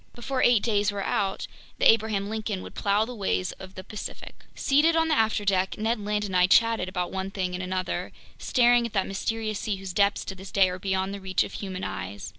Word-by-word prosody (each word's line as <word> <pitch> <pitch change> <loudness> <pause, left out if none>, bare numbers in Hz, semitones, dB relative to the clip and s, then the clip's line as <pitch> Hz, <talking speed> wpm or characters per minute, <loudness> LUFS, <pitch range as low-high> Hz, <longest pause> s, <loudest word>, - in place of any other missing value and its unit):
Before 255 +2 -2
eight 240 -4 +4
days 205 -2 +1
were 200 -1 -3
out, 195 0 -1 0.3
the - - 0
Abraham 215 -3 0
Lincoln 215 -3 -3
would - - -10
plow 205 +1 +1
the 250 - -7
waves 190 -4 -1
of 190 0 -11
the 185 - -7
Pacific. 210 +2 -8 0.2
Seated 300 +4 +3
on 325 0 +2
the - - +3
afterdeck, 205 -6 +1
Ned 225 +1 0
Land 210 0 -1
and 190 -2 -4
I 180 0 +5
chatted 225 -2 +3
about 180 -1 -3
one 190 0 -3
thing 185 -2 -3
and 180 - -3
another, 185 0 -3 0.3
staring 240 -2 +3
at 230 - -14
that 195 -3 +1
mysterious 215 +2 -3
sea 210 - -2
whose 190 -1 -7
depths 200 +1 +2
to - - -5
this 190 +1 -10
day 195 -2 +4
are 180 - -6
beyond 190 0 -1
the 200 - -7
reach 190 -1 +1
of - - -8
human 190 -2 -5
eyes. 100 +1 -5
200 Hz, 225 wpm, -26 LUFS, 190-220 Hz, 0.3 s, I